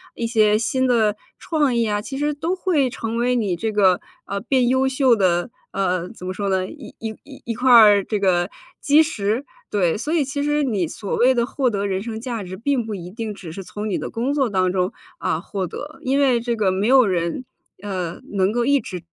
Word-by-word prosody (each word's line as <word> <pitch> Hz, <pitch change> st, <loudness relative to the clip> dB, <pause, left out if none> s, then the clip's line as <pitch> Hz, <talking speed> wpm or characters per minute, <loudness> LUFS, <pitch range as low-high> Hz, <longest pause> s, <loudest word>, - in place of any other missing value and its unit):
一 230 Hz, -, -2 dB
些， 215 Hz, -2 st, +3 dB
新 260 Hz, +3 st, 0 dB
的 220 Hz, -4 st, +2 dB, 0.2 s
创 300 Hz, -6 st, +1 dB
意 235 Hz, -1 st, +2 dB
啊； 205 Hz, 0 st, 0 dB
其 270 Hz, +6 st, -6 dB
实 295 Hz, +1 st, 0 dB
都 320 Hz, +5 st, -2 dB
会 340 Hz, -8 st, +1 dB
成 225 Hz, -2 st, -4 dB
为 245 Hz, +1 st, +1 dB
你 200 Hz, -6 st, 0 dB
这 220 Hz, +6 st, -2 dB
个， 195 Hz, -4 st, +3 dB, 0.2 s
呃， 200 Hz, 0 st, -4 dB
变 250 Hz, +1 st, +2 dB
优 260 Hz, +1 st, +2 dB
秀 265 Hz, -2 st, +3 dB
的 185 Hz, 0 st, +1 dB, 0.2 s
呃， 180 Hz, -2 st, -1 dB
怎 180 Hz, -5 st, -9 dB
么 185 Hz, -, -3 dB
说 200 Hz, +1 st, -2 dB
呢？ 190 Hz, -1 st, 0 dB
一 290 Hz, -1 st, -11 dB
一 220 Hz, -1 st, -5 dB, 0.3 s
一 230 Hz, -, -3 dB
块 250 Hz, +3 st, +2 dB
儿 210 Hz, -4 st, +8 dB
这 210 Hz, +1 st, -2 dB
个 180 Hz, -2 st, +2 dB, 0.3 s
基 295 Hz, +2 st, +5 dB
石。 235 Hz, -5 st, -1 dB, 0.3 s
对， 180 Hz, -4 st, +2 dB
所 295 Hz, +8 st, -3 dB
以 325 Hz, -3 st, +3 dB
其 275 Hz, +1 st, -3 dB
实 295 Hz, 0 st, +1 dB
你 205 Hz, -, 0 dB
所 195 Hz, +5 st, -4 dB
谓 255 Hz, +2 st, +4 dB
的 235 Hz, -1 st, 0 dB
获 270 Hz, -1 st, -1 dB
得 205 Hz, -3 st, 0 dB
人 190 Hz, 0 st, -2 dB
生 225 Hz, -1 st, -5 dB
价 235 Hz, -4 st, -4 dB
值 185 Hz, 0 st, -7 dB
并 245 Hz, +2 st, 0 dB
不 220 Hz, -, -5 dB
一 180 Hz, -3 st, -6 dB
定 220 Hz, +2 st, -5 dB
只 185 Hz, -5 st, -9 dB
是 195 Hz, +4 st, -7 dB
从 210 Hz, +3 st, -5 dB
你 195 Hz, -, 0 dB
的 -, -, -5 dB
工 240 Hz, +4 st, -1 dB
作 280 Hz, -3 st, +1 dB
当 185 Hz, -4 st, +1 dB
中， 185 Hz, 0 st, 0 dB, 0.2 s
啊， 160 Hz, -, -1 dB
获 190 Hz, +2 st, -4 dB
得。 295 Hz, -, -8 dB
因 270 Hz, +1 st, +1 dB
为 260 Hz, -4 st, +3 dB
这 235 Hz, 0 st, -2 dB
个 205 Hz, -4 st, +1 dB
没 190 Hz, +2 st, -1 dB
有 255 Hz, -2 st, +6 dB
人， 170 Hz, +4 st, -1 dB, 0.4 s
呃， 185 Hz, -4 st, -4 dB
能 190 Hz, 0 st, +2 dB
够 240 Hz, +1 st, 0 dB
一 280 Hz, +1 st, +4 dB
直 180 Hz, -8 st, -7 dB
225 Hz, 245 characters per minute, -21 LUFS, 195-260 Hz, 0.4 s, 儿